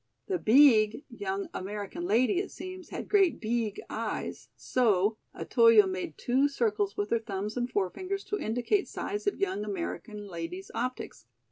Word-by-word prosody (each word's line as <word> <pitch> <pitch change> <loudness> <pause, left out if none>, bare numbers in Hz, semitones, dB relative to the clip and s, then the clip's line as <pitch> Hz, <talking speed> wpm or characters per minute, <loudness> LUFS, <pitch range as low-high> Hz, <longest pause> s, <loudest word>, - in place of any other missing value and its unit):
The 375 -3 -1
"beeg" 230 -1 +5
young 200 -4 -4
American 205 - -5
lady, 255 - +3
it 390 - -3
seems, 370 0 -9
had - - -6
great 390 -4 +3
"beeg" 225 -2 -1
eyes, - - -4
so: 215 -3 +2 0.2
Otoyo 230 -4 +5
made 185 -5 -4
two 265 +4 +2
circles 210 -7 0
with 205 0 -2
her 230 - +3
thumbs 210 -1 -4
and 245 0 -1
forefingers 370 - -2
to 415 - -1
indicate 245 - 0
size 415 0 -4
of 405 - 0
young 380 - -1
American 210 +1 -5
lady's 175 +1 -6
optics. 235 - -4
225 Hz, 150 wpm, -29 LUFS, 205-285 Hz, 0.2 s, beeg